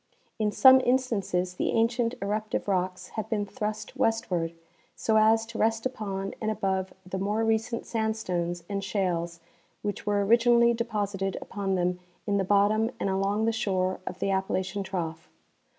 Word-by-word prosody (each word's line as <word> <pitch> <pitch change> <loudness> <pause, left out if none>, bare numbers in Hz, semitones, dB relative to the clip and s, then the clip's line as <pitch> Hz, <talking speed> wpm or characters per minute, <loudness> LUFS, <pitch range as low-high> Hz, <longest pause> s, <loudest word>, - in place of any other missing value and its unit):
In 210 -1 +1
some 260 +4 +8
instances 220 -8 0
the - - -1
ancient 230 +1 +1
eruptive 215 +2 -2
rocks 185 -1 -1
have 220 -3 -5
been 210 -2 0
thrust 215 -1 -5
westward, 180 -7 0 0.4
so 220 - 0
as 220 +1 +4
to 230 0 -8
rest 225 +1 +1
upon 195 -6 -3
and 215 - 0
above 190 -3 -1
the 190 +1 -4
more 210 +3 0
recent 225 +1 0
sandstones 185 -6 -2
and 200 -1 -3
shales 175 -4 -1 0.4
which 205 0 -4
were 205 -1 +2
originally 235 +2 +5
deposited 205 -4 -2
upon 195 -2 -2
them 180 0 0 0.3
in 200 -1 +1
the 195 - +2
bottom 205 +3 +3
and 195 - 0
along 200 +3 +1
the 230 - +3
shore 185 -4 0
of - - -4
the 195 - -1
Appalachian 190 +1 -1
trough. 170 -3 -4
205 Hz, 155 wpm, -28 LUFS, 190-225 Hz, 0.4 s, some